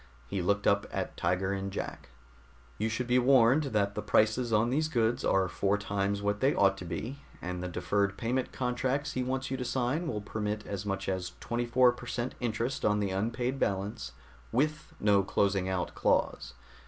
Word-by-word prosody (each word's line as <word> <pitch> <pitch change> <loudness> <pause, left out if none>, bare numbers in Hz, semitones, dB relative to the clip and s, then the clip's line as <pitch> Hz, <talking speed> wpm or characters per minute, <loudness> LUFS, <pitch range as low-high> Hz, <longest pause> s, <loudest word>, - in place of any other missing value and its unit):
He 95 +10 -3
looked 100 +3 +1
up 100 0 +3
at - - -3
Tiger 90 +3 0
and 100 0 -3
Jack. 95 - -6 0.7
"You 110 +1 +1
should 115 +3 -2
be 125 +1 +3
warned 130 +3 +5
that 105 -6 0
the 105 - -3
prices 110 +3 +2
on 110 +2 +3
these 155 +4 +1
goods 120 -3 +1
are 95 -1 +3
four 100 +2 +1
times 100 0 -1
what 105 0 0
they 135 +2 +3
ought 100 -1 +4
to 90 - -7
be, 115 - -5 0.2
and 90 0 -4
the 90 - -3
deferred 100 +3 0
payment 125 +2 -1
contracts 130 +3 -1
he 130 - -2
wants 130 +1 -2
you 130 - -1
to 125 - -3
sign 130 +7 -1
will 110 -8 -2
permit 105 0 -3
as 100 0 -5
much 100 -1 -2
as 95 -2 -2
24 120 +1 +3
per 120 0 -10
cent 120 +1 -2
interest 120 +2 -2
on 105 0 +3
the 100 -2 -1
unpaid 115 +7 -1
balance, 95 - -2 0.4
with 155 +5 0
no 100 -1 +4
closing 95 0 +1
out 95 -1 -2
clause. - - 0
105 Hz, 190 wpm, -30 LUFS, 100-125 Hz, 0.7 s, warned